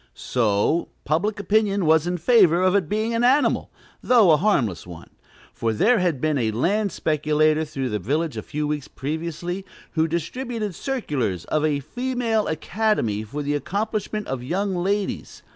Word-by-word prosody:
So, 115 +7 +1 0.2
public 200 +8 0
opinion 205 -1 +1
was 160 +1 +4
in 180 0 -1
favor 180 -3 +4
of 185 0 +3
its 200 -5 +2
being 215 +5 -1
an 230 +1 +1
animal, 265 +4 +2 0.3
though 230 -8 +5
a 155 - +6
harmless 120 - 0
one; 85 -2 -11 0.4
for 115 -1 -1
there 225 - +3
had 175 -7 0
been 155 0 0
a 115 -3 +1
land 195 - 0
speculator 155 0 +1
through 135 -4 -4
the 105 -2 -2
village 150 - -1
a - - -4
few 150 0 -4
weeks 150 -2 -3
previously, 170 +5 -4 0.3
who 160 -1 +1
distributed 215 - -3
circulars 140 - -2
of 155 -1 0
a 145 -2 +1
"Female 245 - -1
Academy" 160 - 0
for 140 +8 -5
the 145 +1 -1
accomplishment 210 - -2
of 130 -2 -4
young 190 +9 -1
ladies. 195 +3 -2
170 Hz, 160 wpm, -23 LUFS, 145-210 Hz, 0.4 s, a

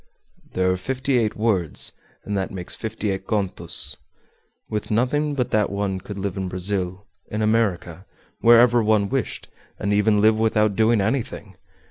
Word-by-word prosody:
"There 95 0 +2
are 90 - 0
fifty 130 +5 0
eight 110 -2 0
words, 100 -8 +1 0.3
and 105 - -2
that 95 -1 -1
makes 90 -2 -4
fifty 110 -2 -3
eight 95 - -5
contos. 100 -4 -2 0.7
With 105 -1 -4
nothing 145 +7 +1
but 125 -3 -1
that 105 -1 +2
one 100 -1 -2
could 100 +2 -8
live 100 -1 -3
in 95 -1 -2
Brazil, 95 +1 -2 0.2
in 105 +1 -2
America, 100 -5 0 0.3
wherever 120 +1 +6
one 105 -2 +2
wished, 135 -6 -3 0.3
and 100 0 -1
even 105 0 +3
live 110 +1 +4
without 110 -2 +2
doing 110 0 +3
anything! 110 -3 -2
105 Hz, 155 wpm, -23 LUFS, 95-115 Hz, 0.7 s, wherever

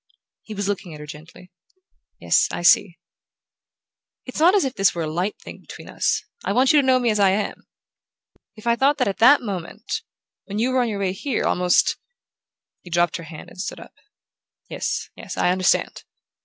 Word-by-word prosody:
He 215 - -9
was 200 -1 -2
looking 190 -5 -4
at - - -11
her 150 - -8
gently. 160 +4 -13 0.7
"Yes: - - +3
I - - -4
see." 175 0 +4 1.3
"It's 255 - -6
not 350 +5 +5
as 390 - +3
if 265 - -2
this 195 -6 +2
were 170 - -2
a - - -3
light 180 +6 -2
thing - - -11
between - - -12
us. - - -1 0.2
I - - -1
want 260 +3 +4
you 295 - +6
to 265 - -3
know 260 -1 +5
me 245 -2 +1
as 210 - 0
I 200 -1 +5
am. 200 +2 -2 0.9
If 215 - -14
I 235 0 +3
thought 275 +4 +2
that - - +1
at 195 - -3
that 255 +4 +6
moment... 200 +2 -5 0.4
when 205 0 -6
you 240 +4 +1
were 255 0 +2
on 240 - 0
your 210 - -3
way 195 -2 -1
here, 255 +6 -2
almost 180 0 +2 0.4
" - - -64
He 175 - -12
dropped 175 -1 +1
her 165 - -9
hand 155 0 -11
and 185 - -7
stood 205 - -5
up. - - -13 0.8
"Yes, - - -3
yes - - -8
I 180 - +2
understand." 185 0 +1
200 Hz, 205 wpm, -22 LUFS, 180-245 Hz, 1.3 s, you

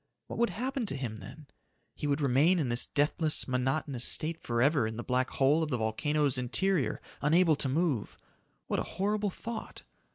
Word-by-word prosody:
What - - -7
would 235 - +3
happen 255 0 -3
to 135 - 0
him, 120 -5 -4
then? 125 +10 -11 0.5
He 150 - -4
would 145 +1 0
remain 145 +7 +3
in 145 -7 0
this 120 +1 +3
deathless, 150 +2 +2
monotonous 130 0 -1
state 160 +4 -1
forever 120 +1 +2
in 110 0 -6
the 120 - -4
black 125 +1 0
hole 140 +4 +2
of 160 - -1
the 125 - 0
volcano's 140 +5 0
interior 170 +6 0 0.2
unable 160 +2 +4
to 135 - 0
move. 145 -5 -1 0.5
What - - -1
a - - -5
horrible 205 +1 0
thought! 225 +4 -7
145 Hz, 175 wpm, -30 LUFS, 125-170 Hz, 0.5 s, unable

